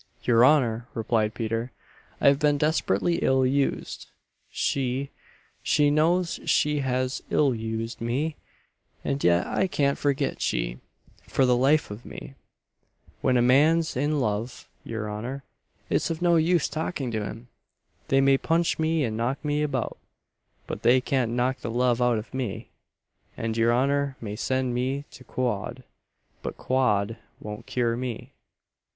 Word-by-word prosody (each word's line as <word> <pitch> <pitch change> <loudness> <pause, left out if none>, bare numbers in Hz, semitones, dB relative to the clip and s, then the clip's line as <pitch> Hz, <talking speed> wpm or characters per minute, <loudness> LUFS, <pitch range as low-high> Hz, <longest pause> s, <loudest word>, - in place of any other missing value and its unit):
"Your 120 -1 +4
honour," 125 -5 +3
replied 110 -1 0
Peter, 115 +2 -2 0.5
"I - - +3
have 140 0 +2
been 150 -1 +3
desperately 155 - +1
ill 130 0 +2
used. 135 +2 -1 0.4
She 135 0 -1 0.5
she 145 -1 +3
knows 170 +4 +2
she 150 0 +2
has 130 -1 -1
ill 140 -3 +3
used 115 +1 -4
me: 140 +7 -1 0.7
and 140 0 -1
yet 85 0 +4
I 190 - 0
can't 140 -5 0
forget 140 -1 0
she, - - -1 0.5
for 135 - +2
the 125 -1 +4
life 135 +1 +2
of 105 +4 -8
me! - - -9 0.9
When 125 - +3
a 120 - +3
man's 155 +6 +4
in 145 +3 +1
love, 110 0 -2 0.2
your 110 -1 -4
honour, 120 +7 -5 0.4
it's - - 0
of 165 -1 -3
no 175 -1 +3
use 165 0 +3
talking 150 -4 -3
to 110 -2 -2
him! 115 +4 -8 0.6
They 135 0 +3
may 135 0 +4
punch 165 0 +1
me 160 -1 +1
and 110 -4 -2
knock 125 +6 -2
me 150 0 0
about, 135 -5 -2 0.7
but - - -6
they 125 +2 +5
can't 125 -2 0
knock 125 +2 0
the - - -5
love 120 +1 +1
out 120 -2 +3
of 110 +3 -7
me; 125 -6 -4 0.7
and 115 -1 -2
your 115 +1 +3
honour 140 +2 +1
may 105 -2 -5
send 130 +2 -1
me 130 +3 -1
to 130 - -13
quod, 125 0 -3 0.6
but - - -5
quod 115 -4 +1 0.2
won't 105 0 -8
cure 120 -2 0
me. 125 -2 -5
130 Hz, 150 wpm, -26 LUFS, 115-145 Hz, 0.9 s, they